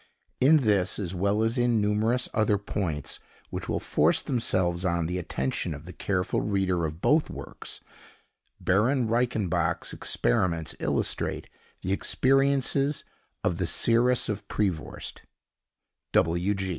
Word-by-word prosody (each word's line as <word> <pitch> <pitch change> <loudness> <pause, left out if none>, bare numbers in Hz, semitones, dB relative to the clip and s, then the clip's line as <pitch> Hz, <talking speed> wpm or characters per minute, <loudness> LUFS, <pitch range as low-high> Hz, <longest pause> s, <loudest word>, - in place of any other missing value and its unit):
In 150 +5 +6
this, 105 -8 +2
as 95 -3 -3
well 100 +4 +1
as 115 +3 0
in 120 -2 +3
numerous 110 +4 +1
other 105 -1 +2
points, 90 -7 -3 0.3
which - - -5
will - - 0
force - - +2
themselves 95 -8 0
on 85 -2 0
the 90 +2 -2
attention 65 -3 -2
of 75 +3 -11
the 90 - -9
careful 90 -2 -1
reader 95 -4 0
of 80 +2 -6
both 150 +1 +3
works, - - -8 0.8
Baron 120 +6 +2
Reichenbach's 110 -5 0
experiments 80 +6 0
illustrate - - -1 0.3
the 95 - -2
experiences 135 +4 +2 0.4
of - - 0
the - - 0
Seeress 120 +2 +3
of 105 -2 -4
Prevorst. 95 -8 -3
105 Hz, 120 wpm, -27 LUFS, 90-120 Hz, 0.8 s, In